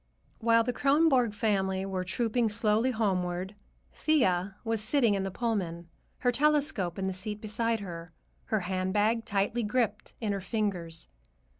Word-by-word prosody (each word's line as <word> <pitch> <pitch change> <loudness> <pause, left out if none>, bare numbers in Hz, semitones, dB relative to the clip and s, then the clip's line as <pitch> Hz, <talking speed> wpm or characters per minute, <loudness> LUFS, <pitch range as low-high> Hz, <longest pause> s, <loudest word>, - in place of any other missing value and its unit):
While 230 0 +4
the 245 +1 -1
Kronborg 275 -6 +3
family 195 -3 0
were 190 -1 -2
trooping 230 +4 0
slowly 220 +2 +2
homeward, 190 -5 -1 0.4
Thea 190 - +1
was 225 -2 0
sitting 235 -1 +3
in 195 - 0
the 195 - -2
Pullman, 185 -6 -2 0.3
her 245 - +3
telescope 280 - +1
in 190 - -2
the 190 - -1
seat 210 +3 -4
beside 225 +1 -1
her, 170 -3 -7 0.3
her 215 -2 0
handbag 195 +5 0
tightly 205 +4 0
gripped 220 -1 -1
in 215 -3 -1
her 200 -1 -2
fingers. 185 -5 -2
210 Hz, 145 wpm, -29 LUFS, 190-230 Hz, 0.4 s, While